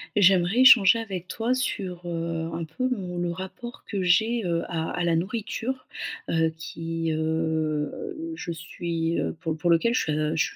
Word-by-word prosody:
J'aimerais 190 +2 +4
échanger 230 -4 +8
avec 190 -5 -5
toi 230 +6 -1
sur, 185 -8 -3
heu, 165 -1 -2
un 170 - -3
peu 165 +11 -2
mon 185 -8 -3
le 175 0 -1
rapport 190 +7 -8
que 200 -2 -2
j'ai, 220 +6 +3
heu, 170 -1 0
à 160 -1 -2
à 180 - -2
la 170 -1 +2
nourriture. 225 +7 -3 0.4
Heu, 160 -1 +2
qui 165 0 -3
heu, 160 - -2
je 180 - -5
suis, 165 0 -2
heu, - - -2
pour 160 -2 -2
pour 175 +2 0
lequel 170 +8 +4
je 155 -7 0
je 160 - 0
175 Hz, 165 wpm, -26 LUFS, 165-220 Hz, 0.4 s, échanger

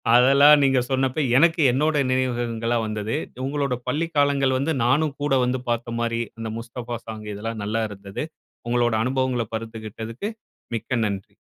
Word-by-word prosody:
அதெல்லாம் 140 +4 +7
நீங்க 135 -1 +4
சொன்னப்ப 135 +2 +1
எனக்கு 165 +2 +4
என்னோட 150 +5 +1 0.2
நினைவுகள்லாம் 120 -2 0
வந்தது. 110 +2 -3 0.3
உங்களோட 140 -2 -1
பள்ளி 165 +3 0
காலங்கள் 140 -2 +3
வந்து 145 +5 0
நானும் 140 +4 +2
கூட 145 -1 +1
வந்து 125 +1 0
பாத்த 120 0 -2
மாரி, 115 0 0 0.2
அந்த 115 0 -4
"முஸ்தஃபா 120 0 -6
சாங்" 110 -1 -7
இதெல்லாம் 110 +2 -5
நல்லா 110 +2 -1
இருந்தது. 100 +2 -6 0.4
உங்களோட 120 -1 +2
அனுபவங்கள 130 -1 0
பகிர்ந்துகிட்டதுக்கு 110 - -6 0.5
மிக்க 120 +1 -2
நன்றி. 100 -2 -5
120 Hz, 140 wpm, -23 LUFS, 115-135 Hz, 0.5 s, அதெல்லாம்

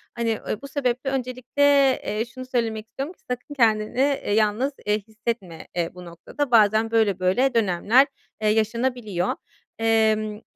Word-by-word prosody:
Hani, 230 -2 0
ııı, 215 - -3
bu 280 - -8
sebeple 270 -1 -1
öncelikle, 255 +1 -2 0.4
eee, 215 +2 -1
şunu 255 +2 -9
söylemek 225 -4 -2
istiyorum 275 +9 -6
ki - - -35
sakın 250 +4 -5
kendini, 225 -1 +1
eee, 275 -6 +1
yalnız, 220 +6 +1
eee, 210 +1 +1
hissetme, 220 -6 -5
eee, 170 -1 0
bu 180 0 -10
noktada. 245 - -5
Bazen 220 0 +4
böyle 215 -5 +2
böyle 240 +9 +2
dönemler, 225 +5 +3 0.3
eee, 215 - +2
yaşanabiliyor. 220 -3 0 0.4
Emm, 220 -1 +1
225 Hz, 150 wpm, -24 LUFS, 210-255 Hz, 0.4 s, Bazen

